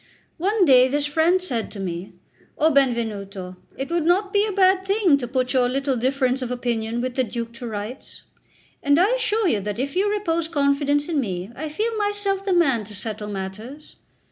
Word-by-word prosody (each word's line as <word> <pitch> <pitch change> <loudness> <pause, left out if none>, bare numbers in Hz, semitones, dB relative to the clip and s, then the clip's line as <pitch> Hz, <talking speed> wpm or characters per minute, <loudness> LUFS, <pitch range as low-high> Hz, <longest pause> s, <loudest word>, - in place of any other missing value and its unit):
One 395 +3 +2
day 255 -3 +6
this 285 +2 0
friend 320 +5 +2
said 250 -12 -3
to 205 - -8
me: 180 -1 -5 0.4
"O 315 +2 +3
Benvenuto, 210 -9 -1 0.2
it 270 +4 -4
would 340 -1 +1
not 385 +5 +2
be 410 +1 +3
a - - -2
bad 380 -1 +3
thing 390 -5 +3
to 245 - -4
put 255 +1 -1
your 250 -2 +3
little 270 +1 0
difference 260 +1 0
of 250 - -3
opinion 240 -2 -2
with 255 0 -3
the 260 - +1
Duke 235 -1 -5
to 240 0 -7
rights; 215 +4 -7 0.6
and 285 0 +3
I 380 +6 +4
assure 450 -4 +1
you 220 -11 +2
that 205 +1 -4
if 275 +5 -3
you 395 +3 +2
repose 335 -6 -1
confidence 285 -1 +1
in 325 -4 0
me, 190 -4 -3
I 310 +2 -5
feel 440 +9 -2
myself 410 -2 -1
the 390 -1 0
man 275 -11 +3
to 210 +1 -9
settle 210 0 -4
matters. 210 +9 -7
275 Hz, 195 wpm, -23 LUFS, 235-355 Hz, 0.6 s, day